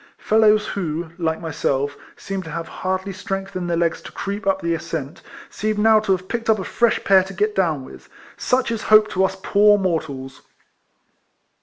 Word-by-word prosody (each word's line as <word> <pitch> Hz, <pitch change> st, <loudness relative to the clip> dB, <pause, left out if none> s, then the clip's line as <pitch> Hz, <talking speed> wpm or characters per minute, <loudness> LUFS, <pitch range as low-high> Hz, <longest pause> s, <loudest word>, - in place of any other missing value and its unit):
Fellows 215 Hz, -1 st, +3 dB
who, 165 Hz, -3 st, -3 dB
like 160 Hz, -2 st, -1 dB
myself, 145 Hz, -3 st, -1 dB, 0.2 s
seemed 195 Hz, -1 st, -5 dB
to -, -, -8 dB
have 165 Hz, +1 st, -5 dB
hardly 190 Hz, +1 st, -3 dB
strength 195 Hz, 0 st, -5 dB
in 180 Hz, -1 st, -3 dB
their 170 Hz, -1 st, 0 dB
legs 170 Hz, 0 st, 0 dB
to -, -, -10 dB
creep 200 Hz, +1 st, -5 dB
up 195 Hz, 0 st, +2 dB
the 170 Hz, -2 st, -1 dB
ascent, 160 Hz, -3 st, -5 dB, 0.3 s
seemed 215 Hz, 0 st, -2 dB
now 220 Hz, +1 st, +5 dB
to 215 Hz, -2 st, -2 dB
have 185 Hz, 0 st, 0 dB
picked 230 Hz, +1 st, -3 dB
up 220 Hz, -, +5 dB
a 190 Hz, -, -4 dB
fresh 235 Hz, +4 st, +1 dB
pair 195 Hz, -1 st, +6 dB
to 190 Hz, +1 st, -8 dB
get 210 Hz, +3 st, 0 dB
down 160 Hz, -9 st, 0 dB
with. -, -, -14 dB, 0.3 s
Such 255 Hz, -1 st, 0 dB
is 225 Hz, -2 st, -2 dB
hope 215 Hz, 0 st, +5 dB
to 190 Hz, -, +1 dB
us 190 Hz, 0 st, 0 dB
poor 205 Hz, 0 st, +5 dB
mortals 155 Hz, -8 st, -3 dB
190 Hz, 190 wpm, -21 LUFS, 165-210 Hz, 0.3 s, pair